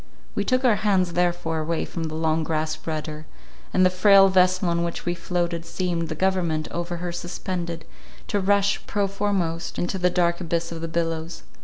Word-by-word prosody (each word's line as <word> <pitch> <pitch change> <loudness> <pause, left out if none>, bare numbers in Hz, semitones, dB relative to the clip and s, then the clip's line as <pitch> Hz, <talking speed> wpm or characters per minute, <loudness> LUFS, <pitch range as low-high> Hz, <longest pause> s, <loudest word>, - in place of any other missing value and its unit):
We - - 0
took 255 0 +1
our 225 -4 +5
hands 190 -5 +1
therefore 175 -2 0
away 160 +1 -1
from 165 -2 -4
the 155 0 -4
long 160 0 +1
grasped 155 0 -2
rudder; 155 -1 -4 0.4
and 185 - +4
the 185 - +4
frail 195 +1 +6
vessel 185 0 +3
on 170 0 +1
which 170 0 -4
we 175 - +1
floated, 170 -1 -2
seemed, 170 -2 -2
the 155 - -3
government 170 -3 0
over 175 0 -3
her 175 0 -4
suspended, 175 -1 -4 0.4
to 205 - 0
rush, 200 +1 +2
prow 205 -1 +1
foremost, 190 -4 -2
into 180 +2 -2
the 180 0 +3
dark 175 0 +1
abyss 170 -1 -2
of 165 -1 -6
the 165 - -3
billows. 165 0 -3
175 Hz, 185 wpm, -24 LUFS, 165-185 Hz, 0.4 s, frail